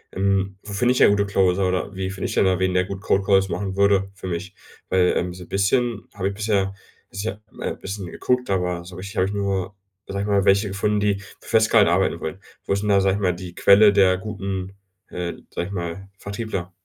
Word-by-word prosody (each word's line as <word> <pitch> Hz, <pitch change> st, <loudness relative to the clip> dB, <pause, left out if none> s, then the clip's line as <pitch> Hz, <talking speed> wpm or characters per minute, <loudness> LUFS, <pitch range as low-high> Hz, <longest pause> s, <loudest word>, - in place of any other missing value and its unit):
Ähm, 95 Hz, 0 st, +1 dB
wo 105 Hz, -, -9 dB
finde 120 Hz, +5 st, +2 dB
ich 125 Hz, -, -1 dB
denn -, -, +7 dB
gute 100 Hz, 0 st, +2 dB
Closer 95 Hz, -1 st, +2 dB
oder 95 Hz, +2 st, -2 dB
wie 95 Hz, 0 st, -3 dB
finde 95 Hz, 0 st, -4 dB
ich -, -, -3 dB
denn -, -, +4 dB
da 95 Hz, -1 st, +2 dB
wen, 95 Hz, -1 st, +1 dB
der 90 Hz, 0 st, +2 dB
gut 100 Hz, 0 st, -6 dB
Cold 100 Hz, -2 st, +1 dB
Calls 95 Hz, -1 st, +3 dB
machen 95 Hz, -2 st, -3 dB
würde 100 Hz, -1 st, +3 dB
für 95 Hz, -, -8 dB
mich? 90 Hz, +2 st, -5 dB, 0.3 s
Weil, 90 Hz, -1 st, +3 dB
ähm, 90 Hz, 0 st, -2 dB
so 90 Hz, -, -10 dB
'n 85 Hz, -, -16 dB
bisschen 110 Hz, +3 st, 0 dB
habe 100 Hz, -1 st, -1 dB
ich 100 Hz, -, -5 dB
bisher 100 Hz, -2 st, 0 dB, 0.4 s
bisher 105 Hz, +1 st, -5 dB
mal -, -, -4 dB
bisschen 100 Hz, -2 st, -6 dB
geguckt, 125 Hz, +7 st, -1 dB
aber 90 Hz, -2 st, -1 dB
so 90 Hz, -1 st, -10 dB
richtig 95 Hz, +3 st, -8 dB
habe 95 Hz, -, +3 dB
ich 100 Hz, -, -4 dB
nur, 100 Hz, -1 st, -2 dB, 0.3 s
sage 100 Hz, 0 st, -3 dB
ich 100 Hz, -, -3 dB
mal, 100 Hz, -1 st, +2 dB
welche 100 Hz, +1 st, +4 dB
gefunden, 105 Hz, +2 st, 0 dB
die 105 Hz, -1 st, +2 dB, 0.3 s
für -, -, -13 dB
Festgehalt 110 Hz, -3 st, +5 dB
arbeiten 85 Hz, -1 st, +1 dB
wollen. 80 Hz, +4 st, -5 dB, 0.3 s
Wo -, -, -4 dB
ist 100 Hz, +1 st, +1 dB
denn 105 Hz, -, -1 dB
da, 100 Hz, -1 st, +5 dB
sage 95 Hz, 0 st, +2 dB
ich 105 Hz, -, -4 dB
mal, 90 Hz, -2 st, +2 dB
die 90 Hz, -1 st, -8 dB
Quelle 105 Hz, +1 st, +6 dB
der 95 Hz, -2 st, +4 dB
guten, 95 Hz, -1 st, -5 dB, 0.4 s
äh, 90 Hz, -1 st, -4 dB, 0.2 s
sage 85 Hz, -, -3 dB
ich 100 Hz, -, -8 dB
mal, 90 Hz, +2 st, -5 dB
Vertriebler? 100 Hz, -3 st, -5 dB
95 Hz, 235 wpm, -23 LUFS, 95-100 Hz, 0.4 s, denn